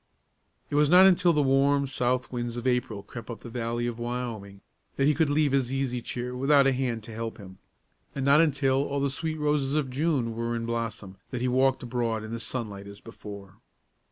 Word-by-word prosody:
It - - -5
was 145 0 +4
not 180 +3 +8
until 180 -2 +5
the 150 -3 +2
warm, 140 +1 +3
south 125 -1 -1
winds 120 -1 -3
of 120 - -5
April 120 -5 0
crept 115 +3 -10
up 115 - -7
the 120 - -9
valley 120 0 -2
of 120 -1 -4
Wyoming, 115 -5 -5 0.3
that 135 - +1
he 150 - +4
could 150 +1 +1
leave 145 -1 +2
his 135 -2 +1
easy 135 -2 -1
chair 125 +1 -5
without 140 +2 +4
a 135 - +4
hand 125 -4 -2
to 115 - -9
help 115 0 -5
him; 95 -2 -12 0.6
and 135 -1 -2
not 140 +3 +6
until 135 -3 +2
all 140 0 -2
the 140 0 0
sweet 160 +3 -3
roses 150 -2 0
of 145 -4 0
June 135 -5 0
were 115 +1 -2
in 115 0 -3
blossom 115 -4 -4
that 125 - -4
he 125 - +1
walked 130 +1 +2
abroad 115 -3 -2
in 110 - -7
the 115 - -4
sunlight 110 -4 -5
as 100 0 -10
before. 100 -4 -11
125 Hz, 215 wpm, -27 LUFS, 115-140 Hz, 0.6 s, not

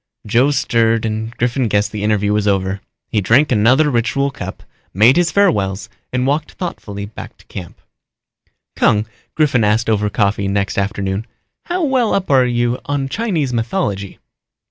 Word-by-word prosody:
Joe 120 +6 +3
stirred 115 -5 +1
and 110 0 -2
Griffin 125 +1 0
guessed 105 0 +1
the 105 - -5
interview 105 -1 +1
was 105 0 0
over. 95 -1 0 0.3
He 105 - 0
drank 120 +10 +3
another 130 +7 +4
ritual 135 +4 0
cup, 95 -7 -8 0.3
made 115 +7 +6
his 175 -2 +3
farewells 105 - +1 0.2
and 125 0 0
walked 150 +3 -1
thoughtfully 100 - -6
back 105 - -10
to - - -22
camp. 90 - -9 1.0
"Kung," 105 0 +2 0.3
Griffin 140 -7 +2
asked 110 +2 +2
over 105 -1 +1
coffee 100 -1 0
next 100 0 -1
afternoon, 100 +1 -2 0.4
"how 355 0 -1
well 260 -6 +2
up 190 -5 -1
are 130 -2 +5
you 120 0 0
on 140 -1 -2
Chinese 165 - -1
mythology?" 115 - -2
115 Hz, 155 wpm, -18 LUFS, 105-140 Hz, 1.0 s, made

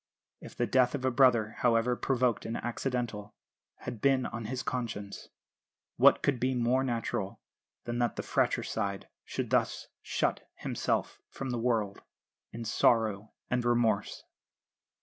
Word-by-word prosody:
If - - -11
the 120 - +1
death 125 +1 +3
of 130 -2 -3
a 130 - +3
brother, 120 -4 +4
however 120 0 +3
provoked 125 -2 +1
and 115 - -2
accidental, 120 -4 -3 0.5
had 110 - -6
been 135 -2 +3
on 115 -1 -5
his 130 +3 -3
conscience, 115 -5 -4 0.7
what - - +6
could 140 -4 +1
be 130 +1 +1
more 125 +2 +2
natural 115 -4 -2 0.4
than 120 0 -3
that 120 -2 +1
the - - -4
fratricide 100 -1 -1 0.2
should - - -4
thus - - +1
shut - - -1
himself - - -2
from 135 -1 -5
the 120 - -1
world 110 -4 0 0.5
in 115 +1 -6
sorrow 110 -2 +2 0.2
and 125 -1 +1
remorse? 120 -3 +1
120 Hz, 140 wpm, -30 LUFS, 110-125 Hz, 0.7 s, what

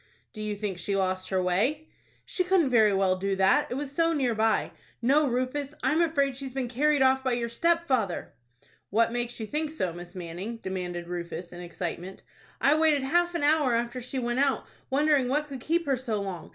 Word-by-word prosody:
"Do 215 - -7
you 210 -1 -2
think 200 -3 -4
she 200 +2 -1
lost 185 -1 -1
her 190 - +1
way?" 240 - 0 0.4
"She 365 - -1
couldn't 360 -7 +2
very 220 -3 +5
well 190 -1 +2
do 195 +1 -1
that, 195 +10 +3
it - - -3
was 280 0 -4
so 330 +3 +2
near 260 -6 +1
by. 220 0 +1 0.3
No, 280 +5 +3
Rufus, 255 +4 -2
I - - +2
am 315 +3 +3
afraid 280 -5 +1
she 275 +1 -7
has 260 -1 -8
been 260 -2 -1
carried 285 +3 +2
off 265 0 +3
by 260 -2 +1
your 235 -1 -1
stepfather." 265 - 0 0.6
"What 230 +3 +2
makes 240 0 -3
you 220 - -3
think 300 +7 -2
so, 185 - -2
Miss 175 +2 -10
Manning?" 180 +6 -6
demanded 180 -4 -5
Rufus, 175 0 -6
in 175 - -8
excitement. 175 +1 -6 0.4
"I 280 - +4
waited 310 -3 +3
half 345 +5 +1
an 335 - -1
hour 290 -5 +3
after 240 +2 -2
she 255 +2 -5
went 240 0 -1
out, 275 -1 +1 0.2
wondering 285 -1 +3
what 295 +4 0
could 275 -3 -7
keep 335 +4 0
her 275 -2 +2
so 235 -4 -2
long. 190 -5 -5
245 Hz, 210 wpm, -27 LUFS, 195-290 Hz, 0.6 s, very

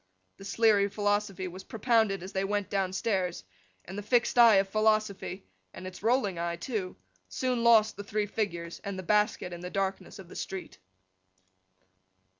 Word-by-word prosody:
The 195 - -11
Sleary 205 -1 +3
philosophy 205 -2 -1
was 185 +2 -9
propounded 220 -4 +1
as 190 +2 -8
they 190 - 0
went 205 0 -2
downstairs 190 - -1 0.4
and 190 - -8
the 205 - -4
fixed 235 +3 +1
eye 230 -3 +8
of 195 0 +3
Philosophy—and 195 - -2
its 185 0 -8
rolling 215 -5 +1
eye, 170 0 -1
too—soon 185 - -4
lost 220 -2 +5
the 205 - -5
three 210 +1 -1
figures 170 -5 -4
and 200 -2 -4
the 185 - -5
basket 210 -2 +1
in 175 - -7
the 180 - -5
darkness 195 +1 -3
of 190 -3 -11
the - - -13
street. 190 -1 -6
195 Hz, 155 wpm, -29 LUFS, 185-215 Hz, 0.4 s, eye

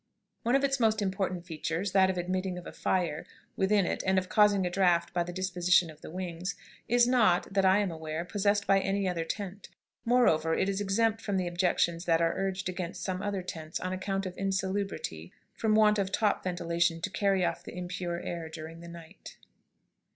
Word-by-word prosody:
One 240 +3 +2
of 275 - +2
its 275 -1 +1
most 220 -2 +3
important 190 -3 -2
features, 165 +3 -3
that 190 -1 +4
of 190 - -1
admitting 185 +1 -2
of 180 - -8
a - - -7
fire 170 -5 -1 0.3
within 195 0 +2
it - - -1
and 190 0 +2
of 185 -1 0
causing 205 -3 +4
a - - 0
draught 175 -2 +2
by 175 - +1
the 175 +1 -3
disposition 180 -2 +2
of 155 0 -17
the - - -9
wings, 180 +2 -4 0.3
is 240 +1 +4
not, 220 -8 +3
that 195 -1 +3
I 190 +1 +5
am 205 -3 0
aware, 160 +1 -4
possessed 200 +1 +1
by 195 0 +4
any 195 0 0
other 175 -2 -1
tent. 200 +3 -6 0.3
Moreover, 165 -10 +3
it - - +1
is 200 0 -1
exempt 220 +3 +1
from 205 -3 -1
the 185 - 0
objections 175 -1 0
that 165 -1 +3
are 165 0 +2
urged 195 0 -2
against 180 -1 -5
some 185 -1 -2
other 200 -2 -2
tents 160 -3 -5
on 185 0 -3
account 195 +1 -2
of 185 -1 -5
insalubrity 190 - -3 0.2
from 215 -1 +1
want 210 -1 +5
of 195 -1 -1
top 210 0 +1
ventilation 170 -2 0
to 195 - -3
carry 195 0 +2
off - - -2
the - - -9
impure 180 -1 -4
air 170 -2 -5
during 160 +1 -8
the 170 - -10
night. 170 -1 -12
185 Hz, 200 wpm, -29 LUFS, 170-200 Hz, 0.3 s, I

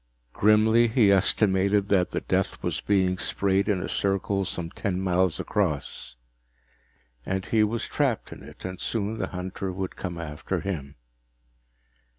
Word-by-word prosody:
Grimly, 110 +3 +4
he 110 -3 +4
estimated 100 0 +3
that 95 -3 +3
the - - -3
death - - -1
was - - -1
being 95 -2 +1
sprayed 100 +1 +1
in 95 -3 +1
a - - -3
circle 100 0 0
some 85 -2 -3
ten 95 -4 -2
miles 95 -2 +1
across. 75 -11 -2 1.1
And 95 +4 -2
he 110 -1 +3
was 110 +2 -1
trapped 135 -6 -1
in - - -12
it, - - -12
and 95 0 -5
soon 110 0 -2
the 95 - -1
hunter 95 +1 -5
would 95 0 -4
come 90 -2 -5
after 75 -3 -4
him. 75 -8 -4
95 Hz, 150 wpm, -26 LUFS, 90-105 Hz, 1.1 s, Grimly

